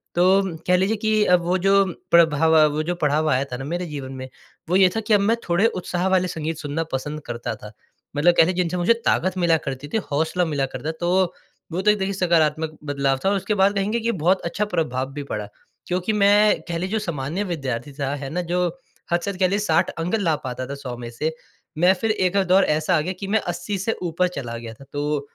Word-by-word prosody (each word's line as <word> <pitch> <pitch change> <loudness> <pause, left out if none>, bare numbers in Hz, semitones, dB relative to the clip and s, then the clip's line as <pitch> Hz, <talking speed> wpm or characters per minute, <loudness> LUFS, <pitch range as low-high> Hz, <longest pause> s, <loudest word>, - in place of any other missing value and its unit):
तो 185 0 +3
कह 180 - +5
लीजिए 195 +4 +1
कि 215 0 +2
अब 180 -1 +4
वो 180 +2 +2
जो 195 +2 +4 0.3
प्रभाव, 160 -1 +5 0.2
वो 155 +1 -1
जो 175 +2 -2
पड़ाव 155 -1 +1
आया 130 -1 +2
था 125 - -3
ना 135 - -6
मेरे 175 +4 -3
जीवन 140 -5 -6
में, 130 0 -7 0.4
वो 180 - +2
ये 190 -1 +6
था - - +1
कि 220 - 0
अब 205 - +6
मैं 220 +3 +3
थोड़े 175 +5 +3 0.2
उत्साह 180 +1 -1
वाले 185 -1 +2
संगीत 160 -1 -4
सुनना 150 +2 -2
पसंद 150 +3 -3
करता 120 0 -4
था। 105 - -11 0.4
मतलब 165 +5 +4
कह - - +8
लें 180 - 0
जिनसे 180 0 0
मुझे 180 +6 +4
ताकत 185 +2 +1
मिला 170 -2 +3
करती 135 +1 -4
थी, 150 - -1
हौसला 160 +5 +1
मिला 145 -4 0
करता। 150 +3 -5
तो 180 +1 +1 0.4
वो 175 +3 -1
तो 210 +2 +5
एक 210 - 0
देखिए 195 0 -2
सकारात्मक 160 -4 +1
बदलाव 140 -2 0
था। - - +4
और 200 - +2
उसके 200 +2 -1
बाद 195 +1 +3
कहेंगे 205 +4 0
कि 230 +1 0
बहुत 185 0 +1
अच्छा 185 +5 -1
प्रभाव 135 -9 -2
भी 145 0 -5
पड़ा। 105 -6 -5 0.4
क्योंकि 185 +4 -1
मैं 205 +1 +4
कह 170 -1 -2
लें 180 +2 -2
जो 220 +2 0
सामान्य 170 -1 -3
विद्यार्थी 140 - -4
था, 140 0 -2
है 140 -1 -6
ना, 180 +5 -2
जो 175 +1 0 0.4
हद 175 - +3
से 200 - -2
हद 190 - -9
कह 190 - +4
लीजिए 200 +3 0
60 165 -7 +2
अंक 165 +6 -1
ला 175 -8 +1
पाता 130 0 -4
था 140 - -5
100 135 -3 -6
में 120 -1 -7
से। 150 +7 -2 0.5
मैं 180 +4 +5
फिर 225 - +2
एक 185 -3 0
अ, 195 - +4
दौर 185 +2 +4
ऐसा 155 +4 +1
आ - - +1
गया 180 +5 -3
कि 195 - -5
मैं 220 +3 +2
80 200 +4 -4
से 195 +4 -1
ऊपर 175 +1 +1
चला 120 -4 -5
गया 115 -1 -8
था। 115 - -15
तो 145 +1 -1
170 Hz, 240 wpm, -23 LUFS, 145-190 Hz, 0.5 s, कह